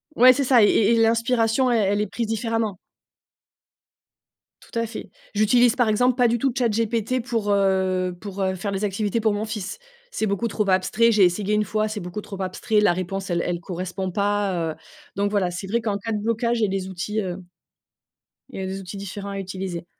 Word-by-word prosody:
ouais, 255 +2 +8
c'est 275 +2 0
ça 250 -2 +5
et 210 - +7
et 215 0 +3
et - - +3
l'inspiration, 230 +2 +2
elle 220 -5 +2
elle 205 - +1
est 210 - -1
prise 230 +3 -3
différemment. 225 -2 -1 1.8
Tout - - -9
à 230 - 0
fait. 225 0 -8 0.2
J'utilise, 230 +3 +4
par 245 -4 +2
exemple, 245 +3 +3
pas 245 -2 +4
du 235 +1 +1
tout 265 +1 0
ChatGPT 230 0 0
pour, 225 -5 -1
heu 190 -2 +1
pour, 200 -2 -6
heu, 190 0 +1
faire 200 +3 -4
les 195 +1 -3
activités 205 +2 -1
pour 220 -1 +2
mon 205 +1 -2
fils. 215 - -5 0.3
C'est 220 - -1
beaucoup 200 +3 -1
trop 210 -2 -1
abstrait, 190 +5 +3
j'ai 210 -3 +4
essayé 195 +4 +2
1 210 - +3
fois, 215 +1 -1
c'est 210 -2 -5
beaucoup 180 +4 -5
trop 195 -2 -9
abstrait, 210 +3 0
la 210 - +4
réponse 190 +2 -4
elle 170 -1 0
elle 175 0 -2
correspond 185 +1 -4
pas, 200 -4 0
heu, - - -18 0.4
donc 200 +1 0
voilà, 190 -4 +1
c'est 190 +2 -6
vrai 235 +4 +1
qu'en 215 -3 -2
cas 225 +3 -5
de 215 - 0
blocage, 230 +2 0
j'ai 220 -2 +2
des 190 -1 -3
outils, 195 +4 -3
heu 185 -1 -5 1.1
il - - -7
y - - -3
a - - -3
des 190 +1 -4
outils 190 +2 -8
différents 200 +1 -6
à 200 - -4
utiliser. 185 -3 -5
205 Hz, 215 wpm, -23 LUFS, 190-225 Hz, 1.8 s, ouais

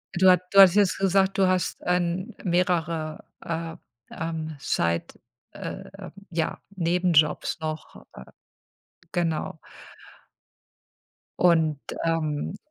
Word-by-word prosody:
Du 185 +1 +5
hatt 180 -1 +5
du 195 - +5
hattest 190 -2 +9
jetzt 205 -3 +3
gesagt, 195 0 +2
du 190 -1 +4
hast, 185 -1 0
ähm, 180 +4 0
mehrere, 170 -3 0 0.2
äh, 165 0 -4 0.4
ähm, 160 -1 -4
Side 85 -9 0 0.5
äh, - - -8 0.2
ja 165 -1 -2 0.2
Nebenjobs 170 -3 +2
noch, 155 0 -6
äh, 65 - -10 0.9
genau. 165 -2 -2 1.8
Und 160 -4 +3 0.2
ähm 165 +2 -1
170 Hz, 100 wpm, -25 LUFS, 160-185 Hz, 1.8 s, hattest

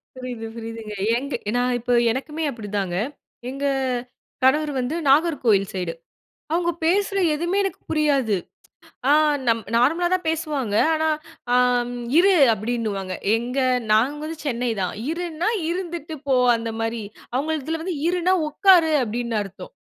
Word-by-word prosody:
புரியுது, 250 -3 -6
புரியுதுங்க, 225 -2 -7 0.2
எங்க 280 +2 -5 0.2
நான் 245 0 +1
இப்ப 245 +1 +1 0.2
எனக்குமே 300 +6 -4
அப்பிடிதாங்க, 205 -7 -3 0.5
எங்க 275 +2 -4 0.8
கணவர் 295 +3 +3
வந்து 255 +6 -2
நாகர்கோவில் 270 - +3
சைடு, 180 -3 -3 0.6
அவுங்க 345 +1 +1
பேசுற 395 +3 +2 0.2
எதுவுமே 345 +6 0
எனக்கு 390 - -4
புரியாது. 280 -9 +2 0.7
ஆ, - - +6 0.4
நம் 230 -1 +2
நார்மலா 325 +9 +3
தான் 365 -3 -4
பேசுவாங்க, 300 -9 -2 0.2
ஆனா 315 0 +1 0.4
ஆ, - - +5 0.6
இரு 390 +2 +5 0.2
அப்பிடின்னுவாங்க, 215 -4 -3 0.2
எங்க 250 +3 -3 0.3
நாங்க 245 +7 +3
வந்து 320 0 -5
சென்னை 245 -2 -1
தான், 180 -1 -1 0.2
இருன்னா, 340 +2 -2 0.2
இருந்துட்டு 340 -3 -4
போ 270 - +3 0.2
அந்த 230 0 -4
மாரி 225 0 -2 0.3
அவுங்கள்துல 315 +3 -2
வந்து 360 -2 -3
இருனா 360 +1 +2
உட்காரு 345 0 +5
அப்பிடின்னு 235 0 -2
அர்த்தம். 200 - -11
275 Hz, 125 wpm, -23 LUFS, 230-325 Hz, 0.8 s, ஆ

